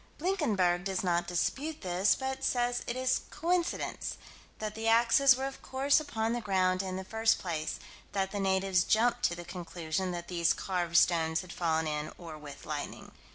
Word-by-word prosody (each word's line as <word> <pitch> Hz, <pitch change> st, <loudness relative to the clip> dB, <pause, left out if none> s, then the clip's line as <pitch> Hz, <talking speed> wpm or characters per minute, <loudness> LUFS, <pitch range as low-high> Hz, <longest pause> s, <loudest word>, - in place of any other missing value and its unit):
Blinkenberg 215 Hz, -, +1 dB
does 190 Hz, -1 st, -1 dB
not 175 Hz, -1 st, +1 dB
dispute 280 Hz, -, -1 dB
this, 185 Hz, +1 st, +2 dB
but 265 Hz, 0 st, -4 dB
says 245 Hz, -1 st, +1 dB
it 235 Hz, -, -2 dB
is 255 Hz, 0 st, +1 dB
coincidence: 345 Hz, +1 st, -1 dB, 0.4 s
that 215 Hz, -1 st, -4 dB
the 225 Hz, +1 st, -3 dB
axes 235 Hz, +4 st, +6 dB
were 265 Hz, +1 st, -3 dB
of 270 Hz, 0 st, -6 dB
course 275 Hz, +3 st, +2 dB
upon 225 Hz, -6 st, -2 dB
the 240 Hz, -, -2 dB
ground 185 Hz, -3 st, +2 dB
in 190 Hz, -1 st, -4 dB
the 190 Hz, -, -4 dB
first 225 Hz, +3 st, +2 dB
place: 160 Hz, -4 st, -3 dB, 0.3 s
that 195 Hz, -1 st, 0 dB
the 205 Hz, -, -3 dB
natives 190 Hz, -2 st, +2 dB
jumped 240 Hz, +2 st, +2 dB
to 175 Hz, -, +2 dB
the 175 Hz, 0 st, -8 dB
conclusion 175 Hz, 0 st, -3 dB
that 175 Hz, -1 st, -5 dB
these 170 Hz, -2 st, +2 dB
carved 175 Hz, -3 st, -1 dB
stones 160 Hz, -2 st, +3 dB
had 185 Hz, -2 st, -10 dB
fallen 160 Hz, -2 st, 0 dB
in 150 Hz, 0 st, -3 dB
or 165 Hz, -3 st, -8 dB
with 145 Hz, -2 st, -10 dB
lightning. 150 Hz, -1 st, -5 dB
190 Hz, 180 wpm, -31 LUFS, 175-240 Hz, 0.4 s, axes